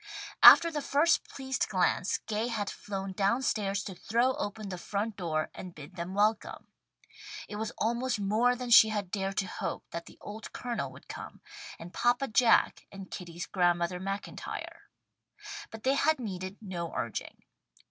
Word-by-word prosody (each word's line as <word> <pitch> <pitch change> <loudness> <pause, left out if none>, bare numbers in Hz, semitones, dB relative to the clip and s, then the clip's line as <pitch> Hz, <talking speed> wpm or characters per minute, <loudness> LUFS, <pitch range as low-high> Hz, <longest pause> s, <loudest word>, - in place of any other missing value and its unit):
After 335 0 +10
the 300 -2 -2
first 290 +4 +2
pleased 265 -1 -2
glance 185 -1 +1
Gay 220 +1 -1
had 215 -4 -2
flown 195 -1 -5
down 200 +7 +1
stairs 200 -5 0
to 195 - -6
throw 235 +8 +1
open 205 0 -4
the 180 -2 -5
front 210 +3 -3
door 160 -4 -2
and 180 -2 -9
bid 150 +4 -11
them 175 +1 -5
welcome. 210 +1 +1 0.8
It 210 - -6
was 220 0 -2
almost 235 +1 0
more 220 +5 +2
than 245 -1 -5
she 220 -1 +9
had 205 -4 -3
dared 195 -1 -2
to 195 - +1
hope - - -4
that 170 0 -6
the - - -14
old 210 +1 -8
Colonel 240 -1 -3
would - - -15
come, - - -8 0.4
and 170 +2 -10
"Papa 245 +3 +1
Jack" 230 +1 +3
and 195 -2 -10
Kitty's 170 -1 -6
Grandmother 175 -1 +1
MacIntyre. 195 +2 -6 0.8
But 225 -1 -10
they 265 - +3
had 305 +1 +2
needed 190 -4 -5
no 175 -4 -4
urging. - - -4
205 Hz, 165 wpm, -30 LUFS, 185-235 Hz, 0.8 s, After